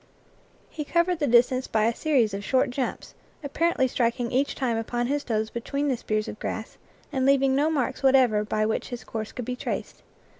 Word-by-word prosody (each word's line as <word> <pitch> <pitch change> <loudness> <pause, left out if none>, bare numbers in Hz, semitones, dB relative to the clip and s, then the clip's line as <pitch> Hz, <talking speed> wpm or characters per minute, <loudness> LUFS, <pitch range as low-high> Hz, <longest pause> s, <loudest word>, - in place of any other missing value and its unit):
He 305 - -4
covered 340 +3 +1
the 290 - +1
distance 245 +2 +3
by 215 -1 +1
a 230 - +2
series 245 -7 +1
of 200 +1 -4
short 255 +2 +1
jumps, 255 0 -4 0.3
ap 285 - -6
parently 330 -5 +2
striking 235 -1 -1
each 265 +3 +1
time 250 -4 0
upon 240 +2 -2
his 285 +3 -1
toes 220 -2 -1
between 280 +5 -2
the 260 - +2
spears 215 -2 -2
of - - -7
grass, 220 - -5 0.3
and 265 -2 0
leaving 270 0 +4
no 295 +3 +2
marks 275 -4 -1
whatever 260 -6 +4
by 215 0 0
which 220 - -2
his 245 -1 -6
course 220 -1 -5
could 245 - -6
be 250 - -3
traced. - - -5
250 Hz, 200 wpm, -26 LUFS, 225-275 Hz, 0.3 s, leaving